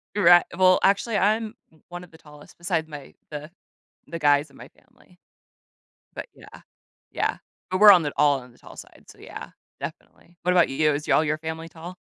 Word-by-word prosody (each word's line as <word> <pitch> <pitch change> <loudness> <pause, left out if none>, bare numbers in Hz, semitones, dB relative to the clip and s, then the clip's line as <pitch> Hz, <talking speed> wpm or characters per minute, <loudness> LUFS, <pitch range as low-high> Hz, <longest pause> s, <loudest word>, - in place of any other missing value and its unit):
Righ 175 -3 +6
well, 185 0 +4
actually, 200 +2 +1
I'm 215 +3 0 0.2
m 160 - -26
one 175 0 -8
of 180 - -16
the 160 - -16
tallest 150 -1 -17
besides 170 -2 -2
my 145 -3 -11 0.2
the 150 0 -8 0.6
the 165 - -7
guys 145 0 +2
in - - -20
my - - -12
family. 180 -1 -27 1.0
But - - -7
yeah, - - -15 0.5
yeah. - - -2 0.3
But 185 +1 -2
we're 210 -1 +10
on 180 -4 +5
the 145 - -3
all 145 -2 +3
on 125 -1 -15
the - - -24
tall - - -15
side, - - -15
so - - -17
yeah, - - -10 0.3
definitely. 170 0 -11
What 180 - 0
about 175 -2 +3
you? 150 +2 +1
Is 150 +2 -5
all 155 - +4
your 155 0 -1
family 160 +1 -7
tall? 170 +3 -11
165 Hz, 200 wpm, -24 LUFS, 150-180 Hz, 1.0 s, we're